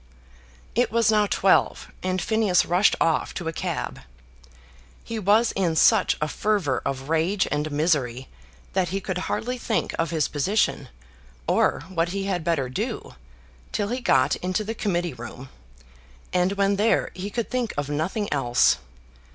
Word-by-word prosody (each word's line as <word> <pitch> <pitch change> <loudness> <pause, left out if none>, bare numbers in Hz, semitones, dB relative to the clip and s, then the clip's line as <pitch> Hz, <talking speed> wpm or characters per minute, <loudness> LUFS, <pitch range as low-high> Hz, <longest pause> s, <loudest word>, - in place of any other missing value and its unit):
It 245 +2 +1
was 230 -1 +3
now 210 -1 +3
twelve, 195 -1 +2
and 185 0 -1
Phineas 210 -1 +2
rushed 180 +4 +3
off 165 -2 +1
to 175 - -4
a 165 - -2
cab. - - -3 1.0
He 230 -1 -4
was 215 +4 +3
in 175 -4 0
such 205 +3 +4
a 150 - 0
fervour 195 -6 0
of 135 -1 -3
rage 165 +5 +1
and 150 +1 -1
misery 140 -5 0 0.5
that 185 -2 +1
he 195 +3 -2
could 185 -1 -3
hardly 250 +2 -2
think 225 -2 -1
of 165 -1 +1
his 160 -3 +1
position, 145 - 0 0.6
or - - +2
what 165 +1 -2
he 195 +2 -3
had 190 -4 -2
better 155 -6 0
do, 130 - -4 0.6
till 205 0 -1
he 250 +2 -2
got 135 - +3
into 185 +3 -2
the 220 +2 -4
Committee 175 -6 -1
Room; 125 +3 -9 0.8
and 180 +2 +2
when 200 0 +1
there 215 +3 +2
he 190 +3 -5
could 230 +2 -3
think 250 -4 -1
of 145 -1 -1
nothing 170 +9 -2
else. 125 -4 +3
180 Hz, 160 wpm, -24 LUFS, 150-205 Hz, 1.0 s, such